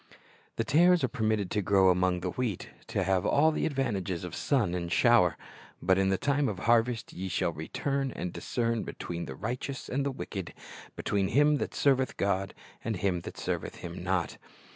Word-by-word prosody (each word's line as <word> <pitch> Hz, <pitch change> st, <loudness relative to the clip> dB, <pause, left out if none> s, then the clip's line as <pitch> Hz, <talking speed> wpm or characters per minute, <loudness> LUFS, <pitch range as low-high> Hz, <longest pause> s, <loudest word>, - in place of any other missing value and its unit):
The 115 Hz, -, 0 dB
tares 175 Hz, +8 st, +4 dB
are -, -, +4 dB
permitted 110 Hz, -6 st, -1 dB
to 105 Hz, -, +1 dB
grow 95 Hz, -1 st, +4 dB
among 90 Hz, 0 st, +1 dB
the 90 Hz, 0 st, -2 dB
wheat, 115 Hz, -6 st, -3 dB, 0.2 s
to -, -, -1 dB
have 95 Hz, 0 st, +1 dB
all 155 Hz, +3 st, +4 dB
the -, -, 0 dB
advantage 130 Hz, -, -1 dB
of 90 Hz, -2 st, -6 dB
sun 115 Hz, -11 st, +1 dB
and 85 Hz, -1 st, -3 dB
shower; 120 Hz, -6 st, +4 dB, 0.4 s
but 95 Hz, +1 st, +2 dB
in 95 Hz, 0 st, +2 dB
the 95 Hz, -, +2 dB
time 140 Hz, +2 st, +1 dB
of 100 Hz, -, -4 dB
harvest 115 Hz, 0 st, +2 dB
ye 95 Hz, +2 st, -4 dB
shall 85 Hz, -, 0 dB
"return, 135 Hz, -, -2 dB
and 90 Hz, -6 st, -5 dB
discern 115 Hz, -2 st, -1 dB
between 85 Hz, -1 st, -5 dB
the 65 Hz, -, -7 dB
right 120 Hz, -, -3 dB
eous 140 Hz, -2 st, -6 dB
and 135 Hz, +2 st, 0 dB
the 140 Hz, -, 0 dB
wicked, 100 Hz, -9 st, -6 dB, 0.4 s
between 100 Hz, -2 st, 0 dB
him 145 Hz, +6 st, +4 dB
that -, -, -4 dB
serveth 135 Hz, -2 st, +2 dB
God 95 Hz, -1 st, 0 dB, 0.3 s
and 110 Hz, -1 st, -1 dB
him 90 Hz, -1 st, 0 dB
that -, -, -9 dB
serveth -, -, -3 dB
Him 85 Hz, 0 st, -7 dB
not."' 95 Hz, -2 st, -1 dB
105 Hz, 190 wpm, -29 LUFS, 90-130 Hz, 0.4 s, tares